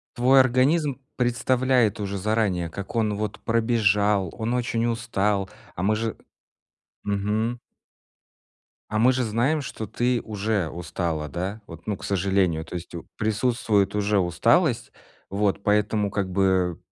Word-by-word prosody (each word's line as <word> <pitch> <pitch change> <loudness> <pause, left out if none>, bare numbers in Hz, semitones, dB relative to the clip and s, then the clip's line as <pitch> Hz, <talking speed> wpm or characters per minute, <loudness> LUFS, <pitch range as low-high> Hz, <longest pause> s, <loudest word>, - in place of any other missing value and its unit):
твой 130 +2 +6
организм 135 +3 +2 0.2
представляет 125 -2 +2
уже 100 -1 -3
заранее 100 -4 0
как 100 +6 -7
он, 110 -2 +1
вот, 105 0 -4
пробежал, 105 -4 +2
он 115 +2 -2
очень 120 -2 0
устал, 105 -4 0 0.3
а 90 - -3
мы 105 +2 +2
же 110 0 -3 0.9
мгм. 105 +4 -1 1.3
А 110 - 0
мы 125 +3 +5
же 130 0 0
знаем, 120 +8 +1
что 110 -5 -6
ты 120 +3 0
уже 105 -3 -1
устала, 80 -2 -3
да, 95 +9 -4
вот, 85 +2 -12
ну, 105 - 0
к - - -13
сожалению, 95 -4 +1
то 90 - -8
есть 85 0 -7
у 85 - -8
присутствует 110 -2 +1
уже 105 0 +2
усталость. 85 -1 +2 0.4
Вот 100 0 0
поэтому 105 0 +1
как 100 -2 -2
бы 95 -2 +1
105 Hz, 140 wpm, -24 LUFS, 95-115 Hz, 1.3 s, твой